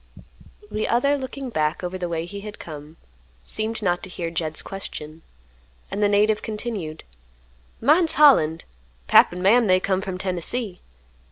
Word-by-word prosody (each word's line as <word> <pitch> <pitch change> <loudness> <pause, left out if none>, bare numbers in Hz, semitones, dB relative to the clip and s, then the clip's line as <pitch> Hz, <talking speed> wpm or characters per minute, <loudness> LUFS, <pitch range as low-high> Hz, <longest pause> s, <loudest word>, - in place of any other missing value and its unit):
The 215 - -1
other, 280 +5 +2
looking 265 -1 -6
back 155 -1 -1
over 180 +1 -3
the 180 -2 -3
way 165 -1 -2
he 200 +3 -7
had 210 0 -8
come, 150 0 -10 0.5
seemed 220 - -2
not 175 -2 +1
to 190 - -6
hear 170 -2 -4
Jed's 155 -2 -2
question, 160 -5 -8 0.7
and 205 - -3
the 205 - +4
native 210 +1 +3
continued, 210 -8 -5 0.8
"Mine's 315 +6 +4
Holland. 205 - +5 0.4
Pap - - +6
an' 180 +1 -6
Mam 225 +4 +5
they 185 0 +4
come 190 0 0
from 190 -2 -4
Tennessee. 185 +2 -2
195 Hz, 155 wpm, -23 LUFS, 170-225 Hz, 0.8 s, Pap